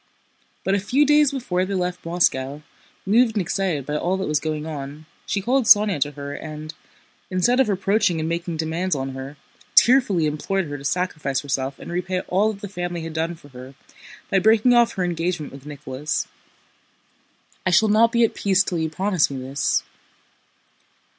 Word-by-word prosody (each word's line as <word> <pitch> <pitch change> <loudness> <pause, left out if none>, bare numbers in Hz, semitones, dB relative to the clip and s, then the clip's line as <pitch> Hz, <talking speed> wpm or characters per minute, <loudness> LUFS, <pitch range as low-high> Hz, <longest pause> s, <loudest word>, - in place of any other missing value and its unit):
But 190 - 0
a 200 - +2
few 260 +10 +2
days 295 0 +5
before 210 -10 -1
they 195 +1 -3
left 180 -2 -3
Moscow, 150 -4 0 0.4
moved 225 +3 +3
and 205 - +1
excited 175 -6 -1
by 150 +1 -2
all 180 +4 0
that 190 - -2
was 150 -1 +1
going 155 0 -3
on, 150 0 -7 0.2
she 200 - -1
called 255 +3 +2
Sónya 205 -7 +5
to 145 +1 0
her 140 0 -6
and, 155 +1 -7 0.6
instead 190 +8 +2
of 265 -5 +3
reproaching 195 -2 +1
and 155 - -2
making 170 0 -3
demands 165 +2 -1
on 135 -1 -3
her, 135 +2 -8 0.4
tearfully 230 -10 +5
implored 170 +6 -1
her 145 -2 -6
to - - -11
sacrifice 150 -4 -1
herself 135 -1 -3
and - - -9
repay 180 +1 -2
all 200 +5 +1
that 200 -2 -11
the - - -3
family 175 -3 -4
had 165 -1 -6
done 165 +2 -2
for 150 -3 -17
her 130 +1 -11 0.6
by 195 - +4
breaking 220 +5 +4
off 240 -1 +4
her 185 - -2
engagement 170 -2 -2
with 135 +1 -12
Nicholas. 145 0 -4 1.4
"I - - +4
shall 215 +5 +4
not 225 +2 +4
be 235 -1 +3
at 225 - +2
peace 195 -1 +2
till 175 -3 -3
you 160 0 -1
promise 185 0 +1
me 135 -2 -5
this." 135 +2 -1
175 Hz, 185 wpm, -22 LUFS, 150-200 Hz, 1.4 s, days